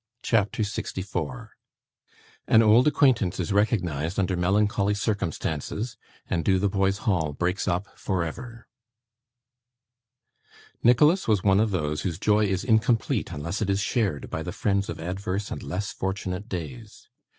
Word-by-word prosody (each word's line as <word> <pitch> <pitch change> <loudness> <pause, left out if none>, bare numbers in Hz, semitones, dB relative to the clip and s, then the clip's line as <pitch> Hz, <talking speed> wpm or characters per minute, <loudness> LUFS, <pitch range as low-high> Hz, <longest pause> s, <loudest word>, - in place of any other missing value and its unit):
CHAPTER 110 -1 +1
64 90 -8 -4 1.0
An 110 - +6
old 115 +5 +5
Acquaintance 125 - +3
is 90 +2 -1
recognised 90 - 0
under 95 -1 +1
melancholy 100 +3 +1
Circumstances, 100 - -2 0.3
and 85 - -1
Dotheboys 95 +2 +1
Hall 80 -8 +1
breaks 90 +6 -1
up 90 +3 0
for 95 -3 -1
ever 115 +8 -8 2.1
Nicholas 150 +10 +4
was 105 -4 +2
one 95 -1 +4
of 110 +1 +2
those 75 -6 -1
whose 85 -4 -3
joy 105 +2 +3
is 95 0 -1
incomplete 115 -1 +1
unless 85 +8 -4
it 105 - 0
is 100 0 +1
shared 100 - -1
by 80 - -3
the 90 - -4
friends 100 0 0
of 85 - -5
adverse 95 +4 -3
and - - -4
less 100 +2 -4
fortunate 95 +2 -4
days. 75 -9 -7
100 Hz, 135 wpm, -26 LUFS, 90-105 Hz, 2.1 s, An